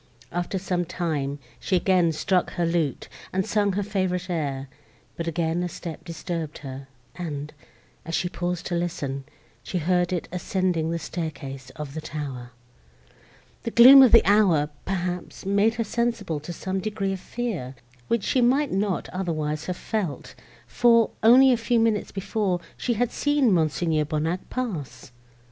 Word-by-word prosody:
After 175 +2 -2
some 180 -1 -1
time, 155 -5 -2 0.2
she 190 - 0
again 180 -2 +3
struck 180 +3 0
her 175 -2 0
lute, 165 -4 -1 0.2
and 190 0 0
sung 205 -2 +1
her 205 +2 0
favourite 185 -2 -1
air; 140 -5 -2 0.5
but 170 - -4
again 165 +1 0
a 180 - -2
step 165 -2 -7
disturbed 165 -2 -5
her, 135 0 -7 0.3
and, 150 -4 -5 0.5
as 165 +1 -3
she 180 - 0
paused 175 0 -3
to 180 - -3
listen, 145 -6 -3 0.4
she 180 - -4
heard 180 +1 +1
it 180 -2 -2
ascending 180 -2 0
the 170 - -1
staircase 140 -6 -6
of 150 -2 -6
the 160 - -5
tower. 135 -6 -6 1.1
The - - -3
gloom 255 +4 +10
of 260 - +7
the 230 - +7
hour, 190 -8 +4 0.2
perhaps, 180 -2 -3
made 200 +3 +3
her 230 - 0
sensible 225 -7 -1
to 150 +4 -7
some 190 +3 -3
degree 200 -1 -2
of 190 - -5
fear, 185 - -4 0.3
which 235 -3 +1
she 255 - +2
might 265 +4 +3
not 195 -1 -1
otherwise 155 -4 -2
have 180 -1 -3
felt; 195 -10 -3 0.3
for, 230 -2 +4
only 255 +4 +7
a 245 - +3
few 235 +1 +1
minutes 225 -2 +1
before, 195 -1 -1 0.2
she 240 - -1
had 245 +2 0
seen 290 -5 +2
Mons. 160 -5 +2 0.3
Bonnac 160 +4 -2
pass. 150 - -5
180 Hz, 160 wpm, -25 LUFS, 160-205 Hz, 1.1 s, gloom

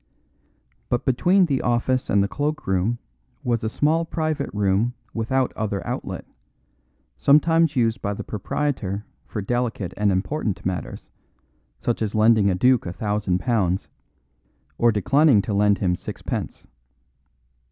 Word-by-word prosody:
But 120 - 0
between 180 +9 +4
the 140 -5 0
office 120 +2 0
and 100 0 +3
the - - 0
cloak 150 +5 -2
room 95 +5 0 0.5
was 120 -3 0
a 110 - 0
small 155 +7 +1
private 155 -3 -2
room 105 +4 +1 0.2
without 125 +3 0
other 105 -3 -3
outlet, - - -4 0.9
sometimes 165 +2 +4
used 115 -3 +1
by 100 0 -2
the - - -6
proprietor 105 -2 -3 0.2
for 105 - -4
delicate 115 -5 -2
and 105 -1 +2
important 105 +3 -2
matters, 90 -1 -4 0.7
such 120 - -2
as 110 -1 -1
lending 110 -2 +4
a 95 - +1
duke 125 +2 +3
a 85 - -4
thousand 105 -3 -1
pounds 95 -6 0 0.9
or 120 0 +5
declining 135 +4 +4
to 105 - -3
lend 100 0 +3
him 90 -2 +1
sixpence. - - -5
115 Hz, 135 wpm, -23 LUFS, 100-135 Hz, 0.9 s, or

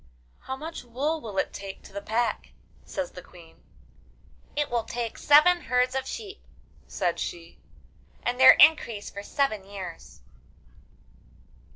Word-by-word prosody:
'How 265 - -6
much 315 +4 -7
wool 285 +7 -2
will 210 -4 -7
it - - 0
take 195 -1 -8
to - - -15
the 200 - -5
pack?' 230 +3 -2 0.3
says - - -5
the - - -10
Queen. - - -17 0.9
'It 295 0 0
will 235 -1 0
take 235 0 -4
seven 345 +5 +6
herds 250 +1 +1
of 265 0 -2
sheep,' 420 -3 -7 0.4
said 175 -4 -1
she, 170 -1 -6 0.6
'and 245 +1 -2
their 260 - +10
increase 240 -9 +4
for 200 - -7
seven 215 -2 -1
years. 190 -3 -9
245 Hz, 140 wpm, -26 LUFS, 205-290 Hz, 0.9 s, their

